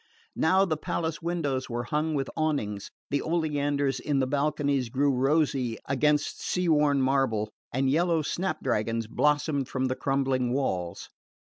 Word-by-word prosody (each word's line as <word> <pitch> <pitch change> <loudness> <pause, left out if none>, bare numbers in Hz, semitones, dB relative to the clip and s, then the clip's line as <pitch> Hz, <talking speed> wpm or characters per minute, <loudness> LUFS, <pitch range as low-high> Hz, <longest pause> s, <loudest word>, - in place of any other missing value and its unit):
Now 190 +4 +3
the 160 -5 -1
palace 160 +1 -3
windows 160 -6 -2
were 120 0 -2
hung 150 +5 -1
with 135 -2 -1
awnings, 140 -11 -1 0.2
the 140 - +1
oleanders 145 -4 0
in 145 -2 -1
the 135 - +2
balconies 140 -2 0
grew 140 +4 +2
rosy 135 -3 +1
against 150 +2 +1
the - - -10
sea 180 -1 0
worn 150 -3 +3
marble, 130 -6 +1 0.2
and 135 +2 0
yellow 165 +3 +2
snap 155 +1 -2
dragons 115 +2 0
blossomed 145 +2 +1
from 130 0 -1
the 130 0 0
crumbling 135 -3 0
walls. 90 -11 -2
140 Hz, 150 wpm, -27 LUFS, 130-155 Hz, 0.2 s, Now